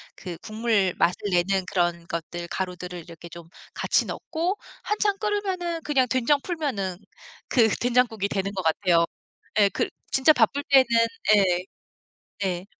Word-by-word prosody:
그 175 -3 -7
국물 215 -4 0
맛을 175 - +2
내는 185 +2 +1
그런 175 -2 0
것들, 170 +1 -5
가루들을 180 -1 -5
이렇게 170 0 -11
좀 170 0 -11 0.3
같이 - - +1
넣고 350 +5 -3 0.3
한참 420 -1 0
끓으면은 375 -5 -2
그냥 265 -4 +2
된장 260 +3 +2
풀면은 255 - -3 0.5
그 230 -3 +5
된장국이 240 -4 +1
되는 195 0 -2
것 190 - -2
같아요 170 +1 +3 0.6
예 200 - +6
글 - - -1 0.2
진짜 270 +4 +5
바쁠 275 +3 +2
때는 270 -2 +7 0.5
예. 180 -2 +2 0.8
네. 185 -2 -2
200 Hz, 265 characters per minute, -25 LUFS, 180-280 Hz, 0.8 s, 때는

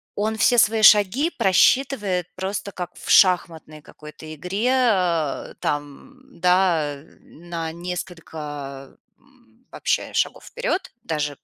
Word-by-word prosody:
он 215 +2 -1
все 245 +2 +3
свои 220 0 +4
шаги 215 - +5
просчитывает 195 - +2
просто 195 +1 -4
как 180 -1 -7
в - - -10
шахматной 165 -5 +3
какой-то 155 +1 -12
игре, 185 - -2
э, 180 - 0
там, 215 - -6
да, 175 -5 +2 0.2
на 165 -1 -7
несколько, 155 -6 -7 0.2
м, 255 -2 -29
вообще - - -2
шагов - - -1
вперед. 475 -6 -3
Даже 150 -3 -3
180 Hz, 110 wpm, -22 LUFS, 155-220 Hz, 0.2 s, шаги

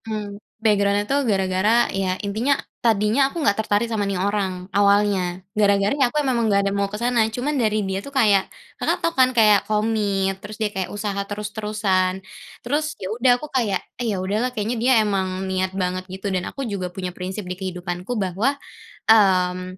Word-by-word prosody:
Mmm, 210 -2 -5 0.2
background-nya 205 -2 +2
tuh 280 +6 +1
gara-gara 195 +4 +2
ya 190 -1 -1
intinya, 230 +8 +1 0.2
tadinya 225 +4 +3
aku 310 - -9
nggak 205 - +4
tertarik 210 +1 +1
sama 225 -2 -2
nih 195 - -1
orang, 190 -1 -1
awalnya, 200 -2 +2
gara-gara 200 -1 +3
ya 275 -3 +2
aku 300 - -4
memang 235 -4 +1
nggak 200 -1 +3
ada 200 - +1
mau 200 0 0
ke 210 - -5
sana. 235 -1 +1
Cuman 250 +7 -2
dari 215 -2 +1
dia 190 0 -2
tuh 280 - -9
kayak 215 -8 +3 0.3
Kakak - - +1
tahu 335 - +1
kan 260 -3 +4
kayak 210 -2 +6
komit, 205 -3 0
terus 210 +1 -9
dia 215 -2 0
kayak 190 -1 -3
usaha 205 -1 -4
terus-terusan. 205 -3 -1 0.4
Terus 300 +5 -1
ya 190 +2 -4
udah 245 +2 +3
aku 300 - -7
kayak, 225 -7 +1 0.2
"Eh, 235 - -1
ya 200 - -1
udahlah, 205 +7 -1
kayaknya 230 -1 -3
dia 255 +2 +3
emang 190 -2 -1
niat 190 0 -1
banget 185 0 -2
gitu," 190 +1 -4
dan 180 -1 -2
aku 275 - -5
juga 195 -5 -3
punya 180 -1 -6
prinsip 190 +3 -5
di 180 - -4
kehidupanku 180 +3 -5
bahwa, 205 +8 0 0.5
mmm, 185 -4 +3
205 Hz, 185 wpm, -22 LUFS, 190-225 Hz, 0.5 s, kayak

